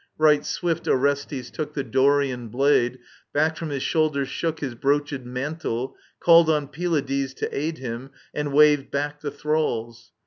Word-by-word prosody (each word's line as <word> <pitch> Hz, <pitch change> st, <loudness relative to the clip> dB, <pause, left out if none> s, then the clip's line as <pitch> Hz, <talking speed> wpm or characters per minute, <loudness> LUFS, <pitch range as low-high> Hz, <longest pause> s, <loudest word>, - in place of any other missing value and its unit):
*^ -, -, -34 dB
Right 150 Hz, -1 st, +4 dB
swift 170 Hz, -2 st, -2 dB
Orestes 140 Hz, -2 st, 0 dB
took 150 Hz, -1 st, -5 dB
The 140 Hz, -, -1 dB
Dorian 135 Hz, -2 st, +2 dB
blade, 125 Hz, +1 st, +2 dB, 0.4 s
back 155 Hz, +2 st, +2 dB
Arom 165 Hz, -, -4 dB
his 140 Hz, -2 st, -3 dB
shoulders 150 Hz, -4 st, +1 dB
shook 160 Hz, +2 st, -2 dB
His 135 Hz, -5 st, -3 dB
broochid 140 Hz, +1 st, 0 dB
mantle, 130 Hz, -1 st, -3 dB, 0.2 s
called 170 Hz, -1 st, +6 dB
on 150 Hz, -3 st, +1 dB
Pylades 140 Hz, -5 st, -1 dB
To -, -, -2 dB
aid 155 Hz, +3 st, -2 dB
him, 125 Hz, +1 st, -6 dB, 0.2 s
and 145 Hz, -1 st, -2 dB
waved 145 Hz, -1 st, +5 dB
back 145 Hz, +1 st, -3 dB
the 145 Hz, -, -3 dB
thralls. 120 Hz, -6 st, -2 dB
145 Hz, 160 wpm, -24 LUFS, 130-155 Hz, 0.4 s, called